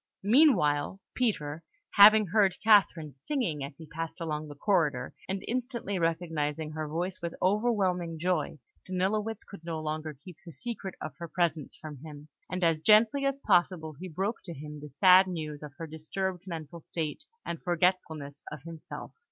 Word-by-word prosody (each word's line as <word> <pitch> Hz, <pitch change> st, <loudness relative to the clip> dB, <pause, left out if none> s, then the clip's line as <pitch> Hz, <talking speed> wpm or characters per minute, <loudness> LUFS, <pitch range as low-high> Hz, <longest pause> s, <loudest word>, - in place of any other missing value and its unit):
Meanwhile, 195 Hz, -, +4 dB
Peter, 165 Hz, -11 st, -1 dB, 0.3 s
having 215 Hz, +1 st, +8 dB
heard 195 Hz, 0 st, +3 dB
Catherine 190 Hz, -8 st, +4 dB
singing 175 Hz, -, -2 dB
as 140 Hz, +1 st, -7 dB
he 160 Hz, -, -10 dB
passed 165 Hz, +2 st, -6 dB
along 155 Hz, -2 st, -3 dB
the 145 Hz, -, -9 dB
corridor, 150 Hz, -6 st, +1 dB, 0.2 s
and 190 Hz, 0 st, -3 dB
instantly 235 Hz, -5 st, -2 dB
recognising 160 Hz, -2 st, -1 dB
her 155 Hz, 0 st, -4 dB
voice 175 Hz, +5 st, -3 dB
with 170 Hz, -1 st, -4 dB
overwhelming 185 Hz, -5 st, +1 dB
joy, 165 Hz, -3 st, -1 dB, 0.3 s
Danilowitz 205 Hz, +4 st, -1 dB
could 200 Hz, -5 st, -12 dB
no 165 Hz, -1 st, -3 dB
longer 155 Hz, 0 st, -4 dB
keep 175 Hz, +1 st, -12 dB
the 170 Hz, -3 st, -11 dB
secret 220 Hz, -4 st, -5 dB
of 155 Hz, -, -6 dB
her 170 Hz, -, -5 dB
presence 165 Hz, -4 st, -1 dB
from 150 Hz, -2 st, -9 dB
him; 150 Hz, -1 st, -10 dB, 0.2 s
and 185 Hz, 0 st, -3 dB
as 165 Hz, -2 st, +3 dB
gently 220 Hz, -, +5 dB
as 275 Hz, 0 st, -1 dB
possible 175 Hz, -, +2 dB
he 175 Hz, +6 st, -8 dB
broke 195 Hz, +8 st, -2 dB
to 170 Hz, -3 st, -7 dB
him 150 Hz, +1 st, -8 dB
the 150 Hz, +1 st, -9 dB
sad 185 Hz, +6 st, +6 dB
news 155 Hz, -5 st, -5 dB
of 150 Hz, -2 st, -9 dB
her 165 Hz, -, -5 dB
disturbed 180 Hz, +4 st, -4 dB
mental 165 Hz, -1 st, -6 dB
state 160 Hz, -, -4 dB, 0.2 s
and 170 Hz, -, -4 dB
forgetfulness 165 Hz, -5 st, 0 dB
of 150 Hz, -2 st, -8 dB
himself. 165 Hz, -1 st, -8 dB
170 Hz, 165 wpm, -29 LUFS, 155-195 Hz, 0.3 s, having